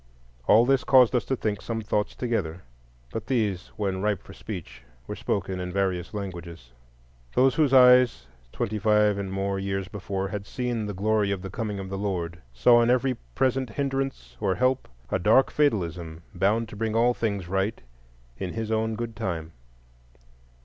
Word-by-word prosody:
All 115 +3 +6
this 135 -1 +3
caused 130 -1 +6
us 120 - +1
to 135 - 0
think 105 -4 -2
some 115 -1 -3
thoughts 105 -1 -1
together; 95 -9 -2 0.5
but 115 - -5
these, 105 -8 0
when 95 -3 -2
ripe 105 -2 0
for - - -12
speech, 75 - -8 0.2
were - - -5
spoken 95 -1 -2
in 90 0 -4
various 95 -2 -1
languages. 85 - -7 0.6
Those 130 0 +5
whose 150 -3 +2
eyes 125 - +6 0.3
twenty 105 +1 -2
five 105 -1 +3
and 95 -1 -4
more 95 0 -1
years 95 0 -2
before 100 -1 -3
had 100 0 -5
seen 120 -4 -2
"the 105 - -5
glory 105 +1 +1
of 100 -2 -2
the 95 - -6
coming 105 -1 -3
of 95 -1 -6
the 95 0 -4
Lord," 85 -5 -3
saw 120 - +5
in 115 - +2
every 130 +1 +3 0.2
present 130 -1 +1
hindrance 135 - -3
or 95 - +1
help 130 +1 +1 0.2
a - - +1
dark 110 +8 +4
fatalism 85 - -1
bound 105 +5 +1
to 105 - -9
bring 110 +1 -2
all 120 +2 +4
things 100 -7 -2
right 95 +4 -1 0.6
in 90 -2 -4
His 110 -1 -3
own 110 0 0
good 115 0 -5
time. 80 -4 -4
105 Hz, 175 wpm, -26 LUFS, 95-115 Hz, 0.6 s, All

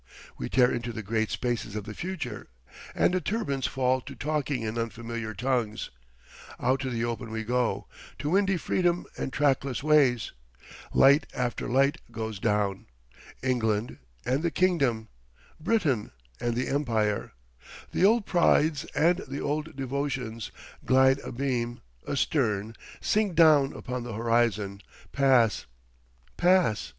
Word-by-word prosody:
We - - -5
tear 125 -1 +4
into 120 0 -3
the 110 -1 -6
great 110 +2 0
spaces 120 -4 -2
of 105 - -3
the 105 - -7
future 185 - -5 0.5
and - - +3
the 185 - +1
turbines 180 - -1
fall 130 0 +1
to 140 +1 -10
talking 145 -4 -2
in 110 0 -3
unfamiliar 115 -1 -4
tongues. 120 -2 -1 0.7
Out 130 +2 +1
to 130 -1 -3
the 115 -1 -1
open 120 0 -4
we 110 0 -3
go, 125 +1 0 0.3
to 150 - -3
windy 195 0 +3
freedom 175 0 0
and - - -4
trackless 135 -2 +1
ways. 140 -6 +3 0.6
Light 140 +3 +5
after 125 0 -2
light 135 +4 +3
goes 110 -3 -5
down. 105 -2 0 0.6
England 115 -3 0 0.3
and 130 +4 +1
the 170 - +1
Kingdom, 140 - +1 0.5
Britain 155 - 0 0.3
and 120 -1 -1
the 125 - -1
Empire, 110 - 0 0.6
the - - 0
old 215 +2 +4
prides 155 -4 +3
and 175 +3 +3
the 135 +2 -5
old 150 +2 -2
devotions, 130 -4 -3 0.3
glide 130 +1 +4
abeam, 120 -3 -2 0.3
astern, 115 -7 0 0.3
sink 210 -4 +1
down 155 -4 +6
upon 125 0 -5
the 120 -2 -6
horizon, 110 -3 0 0.3
pass—pass. 105 - +1
125 Hz, 130 wpm, -27 LUFS, 110-145 Hz, 0.7 s, down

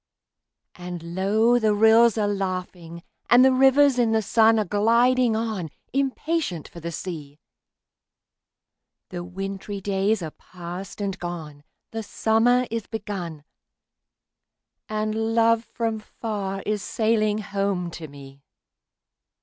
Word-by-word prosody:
And 175 -1 -8
low 215 +6 +3
the 215 -2 +2
rills 225 +1 +5
are 210 -1 +1
laughing, 185 -4 -4 0.3
and 245 +2 +7
the 265 - +5
rivers 270 0 +5
in 230 -2 +2
the 220 -1 +2
sun 225 +2 +4
Are 215 - +1
gliding 230 +4 +3
on, 220 -7 -2 0.2
impatient 275 - -1
for 170 - -11
the 170 +1 -5
sea; 155 -4 -7 1.7
The 175 -3 -5
wintry 195 +2 -6
days 195 +1 0
are 155 - -5
past 180 +5 -9
and 195 -2 -3
gone, 160 -5 -7 0.3
the 225 - -4
summer 225 +4 +2
is 230 -2 -3
begun, 190 -8 -6 1.5
And 215 +1 -1
love 230 0 +3
from 225 -2 -3
far 205 -3 -5
is 210 -1 -1
sailing 215 -1 +1
home 195 -4 -2
to 165 -1 -8
me! 140 -1 -13
205 Hz, 120 wpm, -24 LUFS, 180-225 Hz, 1.7 s, and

